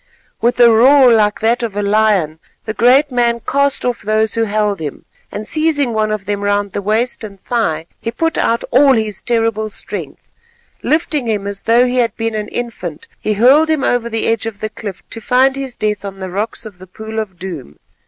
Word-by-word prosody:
With 240 +1 +1
a 240 -1 +7
roar 255 +2 +6
like 210 -2 +2
that 230 +2 +2
of 225 -4 -4
a 205 - 0
lion 200 -7 +1 0.3
the 220 - -3
great 260 +6 +4
man 240 -1 +1
cast 280 +3 0
off 245 -1 -1
those 215 +1 +1
who 230 0 +1
held 210 -1 -1
him 150 -3 -6 0.3
and 210 +1 -6
seizing 305 -5 +1
one 215 -1 0
of 215 -2 -3
them 205 0 -3
round 205 0 0
the 200 - -3
waist 220 +5 -1
and 200 -2 -9
thigh, 185 -9 -1
he 230 - -4
put 325 +8 -1
out 230 0 +1
all 270 +2 +5
his 215 -4 -1
terrible 225 -2 0
strength. - - -7 0.5
Lifting 305 -4 0
him 210 -3 -1
as 200 0 -4
though 235 +2 +4
he 250 0 -1
had 240 -2 +1
been 225 0 -2
an 210 -1 -3
infant, 210 -11 -6
he 215 - -1
hurled 265 +9 +5
him 310 -4 +1
over 240 -1 0
the 225 -1 -1
edge 225 -1 0
of 215 -2 -7
the 215 - -3
cliff 200 -3 -8
to 225 - -7
find 260 +3 +3
his 270 -3 -5
death 210 -1 -2
on 195 -1 -7
the 190 -1 -6
rocks 210 +5 -4
of 200 -4 -11
the 185 - -12
Pool 220 +4 -6
of 200 -5 -5
Doom. 170 - -8
220 Hz, 210 wpm, -16 LUFS, 205-245 Hz, 0.5 s, a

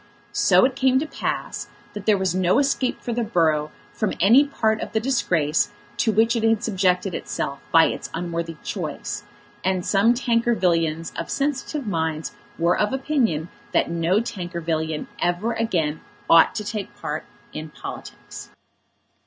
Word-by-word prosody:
So - - +5
it 260 -1 0
came 260 -1 +3
to 285 - +1
pass - - -4 0.3
that 205 0 -8
there 210 -2 +5
was 190 -2 0
no 185 +3 +2
escape 275 -2 +1
for 240 - -3
the 235 +1 0
borough 160 -8 +1 0.2
from 215 - -1
any 230 +10 +7
part 220 -6 0
of - - -6
the 220 - +2
disgrace 170 - +1 0.3
to 225 - +2
which 225 +3 +3
it 230 - 0
had 225 -1 +2
subjected 185 -2 +1
itself 140 -3 -3
by 165 0 +7
its - - -3
unworthy 170 -1 -4
choice, - - -4 0.4
and 185 -1 0
some 210 +5 +4
Tankervillians 180 -10 +1
of - - -4
sensitive 285 0 -2
minds 160 -5 -2 0.3
were 170 +1 +3
of 210 +4 +1
opinion 250 - 0 0.2
that - - +2
no 170 +4 +2
Tankervillian 170 -7 -3
ever 175 +7 0
again 175 -9 -1 0.3
ought 165 -1 +6
to 215 - -2
take 205 -1 -5
part 150 +1 -3 0.3
in 155 0 -6
politics. 140 - -9
190 Hz, 155 wpm, -23 LUFS, 165-230 Hz, 0.4 s, any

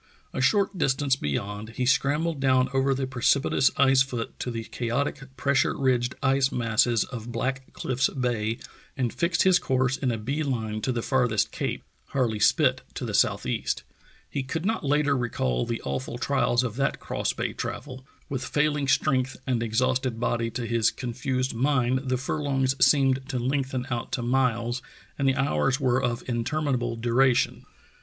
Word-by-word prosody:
A - - -2
short 195 +6 +2
distance 135 -1 +2
beyond 105 - -4
he 125 - -1
scrambled 150 +4 +1
down 130 -1 +3
over 135 0 +2
the 135 0 -1
precipitous 130 +1 +2
ice 135 -1 +5
foot 125 -4 -2
to - - -3
the 115 -1 -4
chaotic, 125 +5 -2 0.2
pressure 140 +1 +1
ridged 125 -2 +1
ice 135 0 +3
masses 115 -1 +2
of 120 -1 -7
Black 130 +1 -3
Cliffs 130 0 0
Bay, 115 -4 -1 0.4
and 125 -3 -1
fixed 170 0 +1
his 185 -1 +5
course 130 0 +1
in 130 - -1
a 115 - -2
bee 135 +8 -2
line 110 -7 -2
to 130 - 0
the 120 -2 -2
farthest 120 -6 +1
cape, - - -3 0.3
Harle} 120 -6 +1
Spit - - +3
to - - -4
the - - -4
southeast. 65 - 0 0.4
He 140 - -3
could 160 +6 -4
not 220 +2 0
later 145 0 +2
recall 65 - -1
the 115 - -3
awful 70 -1 -3
trials 120 +1 +1
of 120 -2 -4
that 135 0 0
cross - - -2
bay - - -3
travel. 130 -2 -6 0.2
With 130 -2 -3
failing 150 +1 0
strength 135 -1 +1
and 125 -3 0
exhausted 125 +1 0
body, 115 -1 0
to 120 +1 -4
his 115 -1 +2
confused 130 +1 -2
mind 130 +1 +1
the 130 - +1
furlongs 135 -1 0
seemed 135 -2 +3
to 130 - -2
lengthen 130 0 -1
out 120 -1 -3
to 125 - -1
miles 120 -1 +1 0.4
and 135 - +2
the 135 - +3
hours 135 0 +1
were 130 -2 +2
of 120 -2 -1
interminable 120 0 -1
du 115 +1 -2
ration. 130 -1 +2
130 Hz, 170 wpm, -26 LUFS, 120-135 Hz, 0.4 s, ice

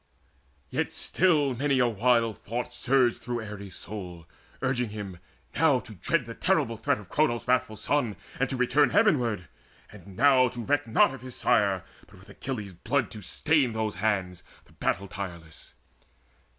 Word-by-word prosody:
Yet - - -2
still 150 -7 +2
Many 140 +2 +1
a 125 -1 +4
wild 115 0 +2
thought 120 +3 -4
surged 125 0 +2
through 120 -1 -4
Ares' 100 -3 -8
soul, 90 -4 -8 0.4
Urging 125 -3 0
him 100 -4 -7 0.3
now 145 -5 +4
to 110 - -12
dread 125 - 0
the 115 - -7
terrible 115 0 +1
threat - - 0
Of 105 -3 -12
Cronos' 125 - 0
wrathful 125 -3 +1
Son, 125 -4 0 0.2
and 135 - +1
to 130 - -3
return 135 +3 +3
Heavenward, 125 - +2 0.4
and 95 -2 -13
now 135 -3 +6
to 120 -1 -6
reck 145 -1 0
not 115 +4 +4
of 135 - -9
his 130 -1 -8
Sire, 100 -6 +2 0.2
But 95 +2 -17
with 95 +1 -17
Achilles' 110 -8 -5
blood 120 +7 -1
to 105 - -8
stain 140 - +1
those 110 -3 -2
hands, 95 -4 -1 0.2
The - - -22
battle 100 - -1
tireless. 85 -5 -8
115 Hz, 165 wpm, -27 LUFS, 100-130 Hz, 0.4 s, now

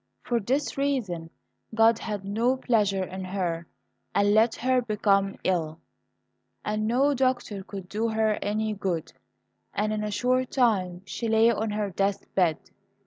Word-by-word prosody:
For 240 -1 0
this 265 +6 -1
reason 210 -13 -1 0.5
God 225 0 +5
had 205 -3 -4
no 230 +6 +1
pleasure 205 -7 +1
in 190 +1 -6
her, 180 -3 -2 0.5
and 205 0 +4
let 220 +1 +4
her 255 +1 +2
become 200 -3 +1
ill, 165 -4 0 0.9
and 215 0 -1
no 270 +5 +3
doctor 250 -6 0
could 195 -2 -8
do 220 +4 -1
her 220 -1 +1
any 215 +1 -1
good, 185 -5 -3 0.6
and 215 +1 0
in 210 0 -2
a 210 - -2
short 255 +4 +1
time 190 -8 +1
she 230 +4 -4
lay 225 +1 +5
on 220 0 -1
her 210 -1 -2
death 195 +2 -1
bed. 175 -5 +3
210 Hz, 150 wpm, -27 LUFS, 195-230 Hz, 0.9 s, God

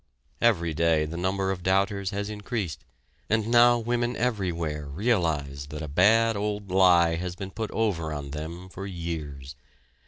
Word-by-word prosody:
Every 85 -9 +2
day 80 -1 +2
the 80 +2 -6
number 95 +2 0
of 95 -2 -4
doubters 95 +1 +1
has 100 +1 -3
increased, 105 -4 -4 0.5
and 110 0 +1
now 120 0 +6
women 120 +1 -1
everywhere 85 -10 -2
realize 75 - -1
that 75 +1 -6
a - - -5
bad 110 +9 +4
old 105 -1 -3
lie 90 -3 +5
has 90 +1 -4
been 95 0 -7
put 110 0 -4
over 90 -8 -1
on 70 -2 -5
them 80 +5 -6
for 100 +1 -7
years. 75 -7 -6
95 Hz, 155 wpm, -26 LUFS, 80-105 Hz, 0.5 s, now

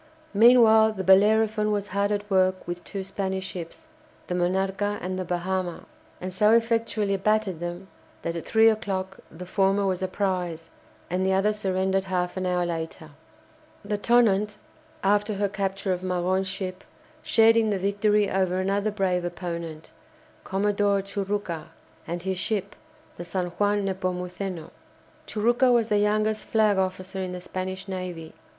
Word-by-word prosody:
Meanwhile 220 0 +6
the 190 -2 -4
"Bellerophon" 215 +3 +4
was 205 -1 -2
hard 200 +2 0
at 205 0 -2
work 185 -2 +1
with 175 0 -5
two 195 -2 -5
Spanish 190 -1 -3
ships, 180 - -8 0.4
the - - -4
"Monarca" 190 +3 0
and 185 +1 -4
the - - -1
"Bahama," 180 0 -3 0.3
and 185 0 -5
so 210 +4 +4
effectually 225 -3 +1
battered 210 -3 0
them 175 +2 -5 0.4
that 170 - -2
at 170 - -4
three 220 0 +4
o'clock 190 -3 -1
the 180 +3 -9
former 195 +1 +1
was 185 -1 -1
a 185 - 0
prize, 180 -4 -2 0.4
and 185 +1 0
the 190 0 +2
other 200 +3 +2
surrendered 190 -1 0
half 180 -2 -1
an 185 -1 -2
hour 180 -1 +1
later. 165 -2 -5 0.7
The 205 0 -2
"Tonnant," 210 -3 +3 0.5
after 205 +2 +2
her 200 +1 +1
capture 195 -1 -2
of 180 - -4
Magon's 185 +1 0
ship, 185 -1 -5 0.4
shared 225 0 +5
in 225 -1 +3
the 205 - 0
victory 205 +2 +2
over 185 -2 0
another 200 +2 0
brave 190 -4 0
opponent, 170 -2 -5 0.5
Commodore 200 0 +1
Churucca, 195 -4 -3 0.4
and 170 +1 -4
his 190 -1 -2
ship, 200 0 -2 0.4
the 175 - -5
"San 180 +1 -2
Juan 205 0 +2
Nepomuceno." 185 -1 -4 0.6
Churucca 240 +4 +2
was 235 -2 +3
the 210 - +3
youngest 215 +1 +1
flag 215 -3 +2
officer 190 +1 -3
in 185 -1 -4
the 180 - -5
Spanish 185 +1 -5
navy. 180 -4 -6
190 Hz, 155 wpm, -26 LUFS, 185-210 Hz, 0.7 s, Meanwhile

